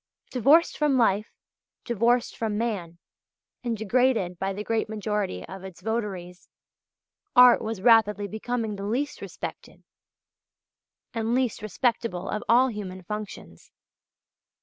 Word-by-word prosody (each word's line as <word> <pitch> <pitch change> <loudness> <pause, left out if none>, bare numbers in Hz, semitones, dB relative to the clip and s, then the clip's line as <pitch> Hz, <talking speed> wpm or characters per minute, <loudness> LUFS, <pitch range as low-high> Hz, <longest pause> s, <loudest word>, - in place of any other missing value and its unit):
Divorced 280 +7 +4
from 295 -3 +3
life, 215 -2 +2 0.6
divorced 235 +1 +1
from 220 -2 -2
man, 200 -8 -3 0.7
and 235 -2 -2
degraded 220 -5 +1
by 195 0 -1
the 200 +2 -5
great 225 -1 -1
majority 210 - -3
of 190 +1 -9
its 190 -2 -10
votaries, 195 -5 -4 0.9
art 250 0 +8
was 220 -4 -4
rapidly 210 -3 +4
becoming 220 0 -3
the 200 - -5
least 270 +7 -2
respected - - -8 1.3
and 230 +1 0
least 255 -5 0
respectable 215 -3 -1
of 215 - -3
all 250 +3 +5
human 190 -4 -7
functions. 210 +2 -8
220 Hz, 120 wpm, -26 LUFS, 195-240 Hz, 1.3 s, art